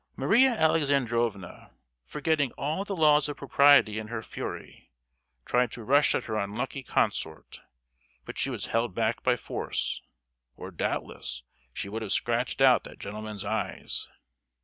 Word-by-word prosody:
Maria 260 +3 +4
Alexandrovna, 125 - 0 0.4
forgetting 150 -3 0
all 155 +7 -2
the 200 -1 -4
laws 150 -3 +4
of 145 - -5
propriety 140 -6 +5
in 110 - -6
her 115 0 -5
fury, - - -7 0.6
tried 125 -1 +1
to 115 - -8
rush 140 +5 +4
at - - -1
her 110 -1 -3
unlucky 110 +7 -3
consort; 100 -10 -2 0.6
but - - -7
she - - 0
was - - -4
held 115 -4 -1
back 115 +1 0
by 125 -1 +3
force, 120 - -3 0.6
or, - - -8
doubtless, - - -4 0.3
she 100 - -5
would 110 +3 -5
have 105 -3 -4
scratched 120 +4 0
out 130 -4 +6
that - - -11
gentleman's 105 0 -6
eyes. 100 -2 -3
120 Hz, 145 wpm, -28 LUFS, 110-145 Hz, 0.6 s, out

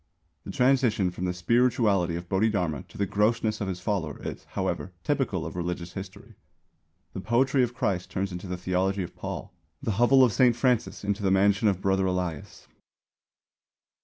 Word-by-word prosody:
The - - -5
transition 125 -8 +2
from 90 +1 -4
the 90 - 0
spirituality 100 -2 +2
of 85 +1 -6
Bodhidharma 95 -7 0
to - - -14
the 100 - +1
grossness 110 +2 +1
of 100 - -1
his 90 -2 -3
follower 90 -6 -2
is, - - -7
however, 95 - -3
typical 125 - -1
of 85 - -6
religious 90 0 -4
history. 95 -1 -9 0.8
The - - -5
poetry 130 +5 +2
of 120 -1 0
Christ 95 -7 -1
turns 95 +1 -2
into 90 +2 -6
the 90 0 -4
theology 95 +2 0
of 85 - -9
Paul; - - -6 0.3
the - - -2
hovel 130 +2 +6
of 120 -4 +3
Saint 125 -3 +4
Francis 125 -4 0
into 100 +1 -1
the 100 - +1
mansion 100 +2 +3
of 95 -2 +1
Brother 95 0 +1
Elias. 90 -5 -4
100 Hz, 170 wpm, -27 LUFS, 90-115 Hz, 0.8 s, hovel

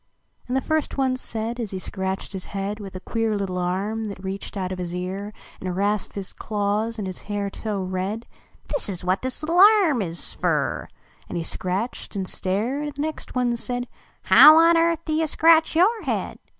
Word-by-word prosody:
And 250 +2 0
the - - +1
first 315 +1 -1
one 260 -1 +2
said, 235 -1 -4
as 225 -3 -3
he 190 - -5
scratched 190 +1 -4
his 190 -1 -5
head 200 +1 -4
With 195 -2 -8
a - - -4
queer 225 +1 -1
little 185 -2 -2
arm 195 +5 -1
that 200 -2 -7
reached 195 +2 -5
out 185 -1 -2
of 185 - -4
his 175 -1 -4
ear 190 +3 -4 0.3
And 185 -1 -4
rasped 205 +1 -1
its 195 -2 -5
claws 210 +2 -1
in 210 - -3
his 185 -1 -6
hair 205 -1 -3
so 205 -3 -3
red 190 +5 -3 0.2
" - - -31
This 285 - +2
is 180 -2 -4
what 185 +2 +1
this 260 +3 -3
little 335 +3 +1 0.2
arm 290 - +2
is 170 -3 -3
fer - - -1 0.2
!" - - -30
And - - -3
he 170 - -2
scratched 190 +8 -3
and 190 -2 -2
stared, 215 +12 -1
and 290 - -7
the 285 - -4
next 315 -3 -5
one 245 -1 +1
said, 245 +1 -3 0.2
" - - -36
How 310 +1 +11
on 335 +1 +6
earth 335 0 +2
do 310 - -1
you 320 +1 +1
scratch 320 +1 +4
your 420 +7 +4
head?" - - -3
210 Hz, 215 wpm, -24 LUFS, 190-260 Hz, 0.3 s, How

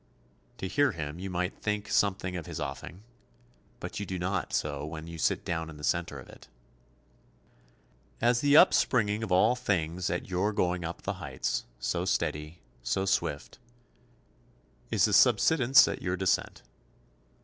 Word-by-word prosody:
To 95 - -4
hear 145 +4 +2
him 80 -1 -5
you 95 +1 -5
might 90 +1 -3
think 105 0 -2
something 95 -2 0
of 85 -3 -6
his - - -6
offing, 90 +6 -6 0.8
but - - -6
you 100 - -3
do 95 - -3
not 90 +1 -2
so 70 -1 -2
when 80 +1 -6
you 85 -1 -9
sit - - 0
down 80 -1 -3
in 75 - -10
the 75 - -12
centre 85 -1 -1
of 65 - -12
it. - - -15 1.7
As 120 +1 +2
the 145 +1 +5
upspringing 110 -8 +4
of 110 - -4
all 110 +7 +4
things 90 -7 -1
at 85 - -3
your 95 +3 0
going 90 -2 0
up 85 +1 -6
the 100 - -2
heights, 70 -4 -3
so - - -1
steady, 75 +3 -2 0.2
so 95 +11 -1
swift, 85 - -2 1.3
is - - +3
the - - 0
subsidence 135 -4 +5
at - - -4
your 90 0 -2
descent. 95 0 -1
90 Hz, 160 wpm, -29 LUFS, 80-105 Hz, 1.7 s, the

